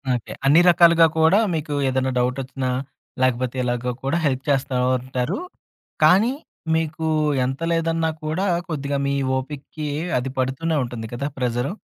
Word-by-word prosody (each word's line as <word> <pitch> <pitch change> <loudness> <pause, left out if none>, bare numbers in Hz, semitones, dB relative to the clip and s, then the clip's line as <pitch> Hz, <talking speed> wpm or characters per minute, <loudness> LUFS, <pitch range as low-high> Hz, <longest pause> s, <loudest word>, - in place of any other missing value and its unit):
Okay. 120 - -6
అన్ని 155 +5 +6
రకాలుగా 170 -1 +6
కూడా, 160 +6 +5
మీకు 155 -2 -3
ఏదైనా 130 0 0
డవుటొచ్చినా, 130 +1 -1 0.5
లేకపోతే 130 0 +1
ఇలాగో 120 0 -1
కూడా 135 +5 0
హెల్ప్ 135 -2 0
చేస్తా 135 -1 +1 0.2
ఉంటారు. 130 - -3 0.6
కానీ, 195 +11 +5 0.4
మీకు 160 0 -2 0.4
ఎంత 135 +4 -4
లేదన్నా 165 -1 0
కూడా, 160 +6 -1 0.2
కొద్దిగా 140 -2 -2
మీ 140 - 0 0.2
ఓపికకి 145 +2 -6 0.3
అది 130 +1 -4
పడుతూనే 135 +5 0
ఉంటుంది 120 -2 -6
కదా! 140 +4 -2
ప్రెజరు? 125 +3 -1
140 Hz, 130 wpm, -22 LUFS, 130-160 Hz, 0.6 s, అన్ని